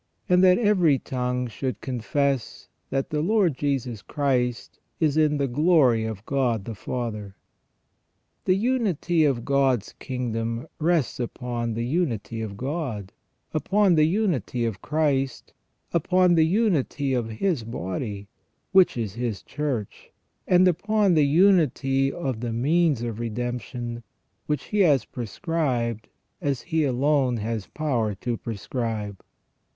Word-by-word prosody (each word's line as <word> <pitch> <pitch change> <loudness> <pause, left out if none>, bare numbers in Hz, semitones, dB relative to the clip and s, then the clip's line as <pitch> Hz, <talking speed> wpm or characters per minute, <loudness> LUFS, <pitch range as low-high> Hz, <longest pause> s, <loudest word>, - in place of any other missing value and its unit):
And 180 0 +4
that 185 -1 +6
every 185 - +3
tongue 125 -1 -2
should 125 -1 -4
confess 135 +1 -2 0.2
that 135 0 -2
the 150 -1 0
Lord 190 - +2
Jesus 130 -6 -2
Christ 125 -4 -1 0.2
is 155 -3 +2
in 155 -1 +3
the 140 -1 0
glory 135 -5 +3
of 110 -1 -6
God 125 -7 0
the 115 - -5
Father." 105 -3 -5 1.1
The 185 - +4
unity 195 - +1
of 125 -5 0
God's 135 -6 +1
kingdom 115 -1 -3
rests 160 -5 +1
upon 120 -1 -3
the 115 +1 -2
unity 120 - -1
of 100 -3 -5
God, 130 - -4 0.4
upon 195 +4 +3
the 155 -2 +5
unity 160 - 0
of 110 -3 -3
Christ, 145 -4 -1 0.4
upon 180 +2 +3
the 160 -2 +4
unity 160 - +1
of 120 -3 -1
His 130 - -1
body 100 0 -5 0.4
which 190 -8 +5
is 110 -5 -3
His 115 -3 -3
Church, 135 -8 -4 0.4
and 185 0 +5
upon 200 +3 +2
the 150 -3 +4
unity 140 -6 +3
of 135 -9 -3
the 120 0 -3
means 145 +2 +2
of 115 -2 -4
redemption, 120 +1 -4 0.5
which 150 -1 -1
He 210 - +2
has 145 - +4
prescribed, 120 - -2 0.3
as 140 -3 -1
He 160 -3 0
alone 135 -1 +2
has 110 -3 -3
power 120 -9 -1
to 120 +5 -3
prescribe. 110 -2 -4
135 Hz, 130 wpm, -25 LUFS, 115-160 Hz, 1.1 s, that